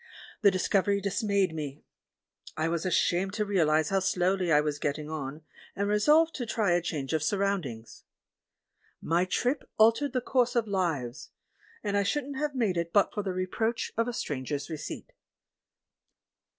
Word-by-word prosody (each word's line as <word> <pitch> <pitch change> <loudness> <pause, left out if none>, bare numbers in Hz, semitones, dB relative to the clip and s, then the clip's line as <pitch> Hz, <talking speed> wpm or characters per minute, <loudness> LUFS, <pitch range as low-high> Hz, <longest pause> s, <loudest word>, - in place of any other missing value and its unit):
The 205 - +7
discovery 200 +1 +1
dismayed 200 -2 0
me. 150 -2 -6 0.7
I 160 +1 0
was 170 +1 -1
ashamed 185 +1 +1
to 210 -1 -1
realise 155 -6 +2
how 195 - +2
slowly 185 -1 +1
I 150 - +6
was 150 -1 -1
getting 150 +2 -3
on, 150 0 -5 0.3
and 200 +1 -1
resolved 300 +11 +4
to 245 - -3
try 215 -5 +1
a 175 0 +3
change 155 -5 -3
of 160 - +1
sur 200 +7 0
roundings. 170 - -3 1.0
JNIy 175 +3 +1
trip 250 +9 -1
altered 230 +5 +4
the 255 - +2
course 250 0 +1
of 230 -2 +1
lives 165 - -2 0.3
— - - -29
and 205 -1 -1
I 200 - +3
shouldn't 275 +6 -2
have 295 0 -2
made 215 -8 +1
it 170 0 -2
but 200 +1 +3
for 210 - -2
the 195 -2 -3
reproach 185 +6 -2
of 230 +1 +1
a 245 - -2
stranger's 145 - -4
receipt. 155 - -7
190 Hz, 165 wpm, -29 LUFS, 160-215 Hz, 1.0 s, The